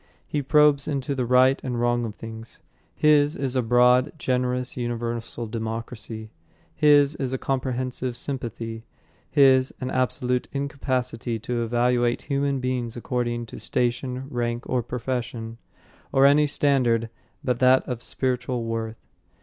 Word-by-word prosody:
He 145 - -2
probes 145 0 +4
into 140 -1 -2
the 130 -3 -2
right 130 +2 +4
and 125 -2 -2
wrong 120 0 +1
of 105 -2 -6
things. 115 0 -9 0.4
His 150 0 +4
is 135 -2 -2
a 130 - +3
broad, 125 +3 +4
generous 125 -2 -1
universal 120 -1 -3
democracy, 110 -1 -5 0.4
his 145 - +5
is 130 -1 -2
a - - 0
comprehensive 130 -1 -2
sympathy, 115 -4 -5 0.5
his 130 -2 +5
an 130 - -3
absolute 125 0 0
incapacity 130 -5 -2
to 120 +2 -3
evaluate 120 +1 +1
human 140 -1 0
beings 125 -2 -2
according 120 -1 -2
to - - -10
station, 125 +2 -1
rank 120 -2 -2
or 125 - +1
profession, 120 -1 -4 0.5
or 135 0 +5
any 145 +2 +5
standard 125 -6 +1 0.3
but 125 -2 0
that 130 0 +4
of 125 -2 -4
spiritual 125 -1 -1
worth. 115 0 -4
125 Hz, 135 wpm, -25 LUFS, 120-130 Hz, 0.5 s, his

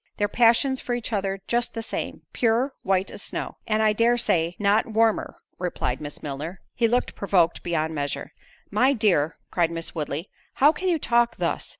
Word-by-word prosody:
Their 205 - +1
passions 240 +4 +3
for 245 - -2
each 235 -1 -5
other 195 -1 -2
just 240 0 0
the 225 - -3
same—pure—white 225 -5 -1
as - - -7
snow." - - -3
"And 220 -1 +2
I 215 -1 +4
dare 235 +3 +3
say, 170 -7 +1
not 205 +1 +2
warmer," 225 0 +1 0.2
replied 170 -7 -2
Miss 145 -1 -7
Milner. 150 +6 -5
He 235 - +2
looked 245 +2 0
provoked 180 -4 +2
beyond 160 -2 -1
measure. 145 -2 -4 0.4
"My 265 +2 +4
dear," 185 - +2
cried 170 -2 +2
Miss 165 0 -5
Woodley, 155 +2 -4 0.2
"how 290 +3 +6
can 370 +4 -4
you 350 -2 +3
talk 240 -4 +2
thus? - - -1
210 Hz, 175 wpm, -25 LUFS, 170-235 Hz, 0.4 s, how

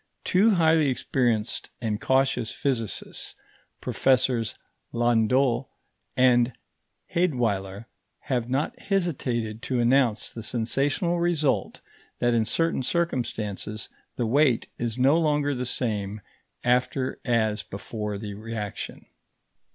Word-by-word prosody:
Two 205 +3 +4
highly 160 -3 +4
experienced 120 -3 0
and 110 -2 -2
cautious 130 -3 +2
physicists, 120 -6 -3 0.5
Professors 125 -3 +2 0.4
Landolt 120 +2 +2 0.5
and 125 -1 +4 0.6
Heydweiller, 115 - 0 0.4
have 125 -3 -2
not 135 +4 -1
hesitated 125 - -1
to 130 -2 -1
announce 120 -2 +2
the 115 - -7
sensational 140 - 0
result 165 -5 0 0.4
that 120 0 +2
in 115 -2 +2
certain 165 +4 +1
circumstances 115 - -2 0.3
the 120 - -1
weight 130 0 +3
is 120 -1 -2
no 135 +6 +4
longer 150 -2 +1
the 125 -1 -3
same 105 -4 -2 0.4
after 125 +2 +1
as 110 -3 +1
before 105 +1 -5
the 105 0 -6
reaction. 105 -1 -6
125 Hz, 105 wpm, -26 LUFS, 110-140 Hz, 0.6 s, Two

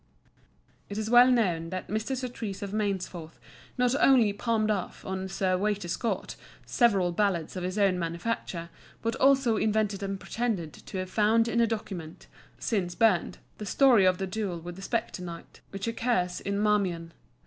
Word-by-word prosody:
It 200 - -5
is 220 +1 -2
well 245 +1 +8
known 180 -10 +1
that 185 +1 -5
Mr. 220 +5 -2
Surtees 225 -6 -5
of 200 - -5
Mainsforth 190 -6 -3 0.4
not 250 0 +2
only 240 -7 +5
palmed 215 0 0
off 195 -4 -4
on 190 0 -3
Sir 185 -1 0
Waiter 205 -2 -1
Scott 225 +7 -2 0.3
several 200 -8 +3
ballads 175 -3 0
of 185 - -3
his 185 +2 -3
own 195 -3 +3
manufacture, 170 0 -3 0.3
but 230 0 0
also 270 -4 +4
invented 210 -2 0
and 195 -1 -3
pretended 210 -11 -2
to - - -9
have 185 0 -4
found 225 +2 +3
in 235 0 +1
a 230 - +4
document 190 -7 -5 0.3
(since 185 -6 -1
burned) 215 -7 +2 0.2
the 210 - -5
story 245 -7 +5
of 185 -1 +4
the 190 - -2
duel 190 -3 -3
with 175 +1 -8
the 190 - -10
spectre 225 -2 -2
knight 170 -2 -9
which 195 +2 -5
occurs 225 -6 0
in 200 0 -2
Marmion. 190 -6 0
200 Hz, 170 wpm, -28 LUFS, 180-225 Hz, 0.4 s, well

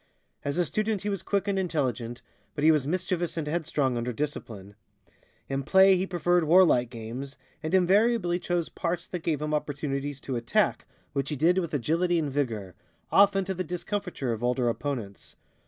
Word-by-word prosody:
As 140 +3 -2
a 175 - +2
student 215 +1 -1
he 205 - -1
was 195 -3 -2
quick 200 0 -1
and 195 -1 +1
intelligent, 130 -9 -2 0.3
but 145 - -3
he 160 - +7
was 150 -3 +1
mischievous 175 0 -1
and 160 - -1
headstrong 150 -5 0
under 120 +1 -2
discipline. 110 -7 -5 0.7
In 135 0 -2
play 190 +6 +6
he 185 +1 -1
preferred 175 -1 +2
warlike 155 -8 +5
games, 120 +5 -7 0.2
and 160 +4 0
invariably 190 0 +3
chose 175 -2 -1
parts 175 0 -3
that 180 - -5
gave 155 -3 -1
him 150 0 -2
opportunities 145 -1 -2
to 130 - -4
attack, 115 0 0 0.3
which 140 0 -1
he 150 - -2
did 170 +6 +3
with 170 -4 -3
agility 170 +6 +1
and 150 -4 -1
vigor, 115 -9 -2 0.4
often 195 -1 +5
to 190 - -2
the 185 0 -3
discomfiture 180 - -3
of 115 +1 -6
older 125 0 +1
opponents. 115 -6 -5
155 Hz, 175 wpm, -27 LUFS, 135-180 Hz, 0.7 s, he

